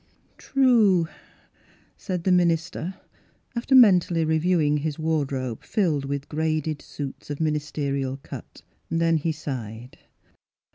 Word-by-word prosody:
" -, -, -38 dB
True," 225 Hz, -, +4 dB, 0.9 s
said 180 Hz, -4 st, -4 dB
the 185 Hz, -, +2 dB
minister, 170 Hz, 0 st, +1 dB, 0.6 s
after 240 Hz, +3 st, +1 dB
men 210 Hz, -8 st, +8 dB
tally 165 Hz, -2 st, -1 dB
reviewing 160 Hz, -1 st, +2 dB
his 150 Hz, 0 st, -3 dB
wardrobe 140 Hz, -7 st, -2 dB
filled 160 Hz, -9 st, 0 dB
with 140 Hz, 0 st, -4 dB
graded 155 Hz, -1 st, -1 dB
suits 140 Hz, -1 st, -8 dB
of 145 Hz, -, -4 dB
ministerial 145 Hz, -3 st, -1 dB
cut. 135 Hz, -, -11 dB, 0.3 s
Then 165 Hz, 0 st, +2 dB
he 160 Hz, +2 st, -1 dB
sighed. 125 Hz, -6 st, -7 dB
155 Hz, 115 wpm, -25 LUFS, 140-175 Hz, 0.9 s, men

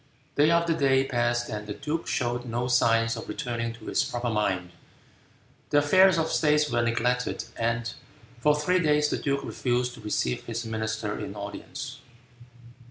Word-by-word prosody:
Day 145 Hz, +2 st, +4 dB
after 170 Hz, 0 st, +3 dB
day 135 Hz, -3 st, +3 dB
passed 120 Hz, -2 st, 0 dB
and 105 Hz, -1 st, -5 dB
the 105 Hz, -, -4 dB
duke 160 Hz, +2 st, -3 dB
showed 120 Hz, 0 st, -1 dB
no 120 Hz, +1 st, -2 dB
signs 115 Hz, -2 st, +3 dB
of 115 Hz, -, -8 dB
returning 115 Hz, -5 st, -3 dB
to 115 Hz, -1 st, -13 dB
his -, -, +1 dB
proper 120 Hz, -3 st, -2 dB
mind. 95 Hz, -5 st, 0 dB, 1.0 s
The 145 Hz, -, +3 dB
affairs 185 Hz, +5 st, +5 dB
of 160 Hz, 0 st, 0 dB
state 150 Hz, -1 st, +3 dB
were 120 Hz, 0 st, +2 dB
neglected, 120 Hz, +1 st, 0 dB
and 115 Hz, 0 st, -1 dB, 0.5 s
for 150 Hz, +4 st, +4 dB
three 180 Hz, +5 st, +2 dB
days 150 Hz, -2 st, +3 dB
the -, -, -1 dB
duke 140 Hz, -1 st, -1 dB
refused 125 Hz, -1 st, -1 dB
to 120 Hz, -, -12 dB
receive 105 Hz, -12 st, -1 dB
his 115 Hz, 0 st, -4 dB
ministers 110 Hz, -1 st, -3 dB
in 100 Hz, -, -6 dB
audience. 130 Hz, +7 st, -7 dB
120 Hz, 165 wpm, -27 LUFS, 115-145 Hz, 1.0 s, affairs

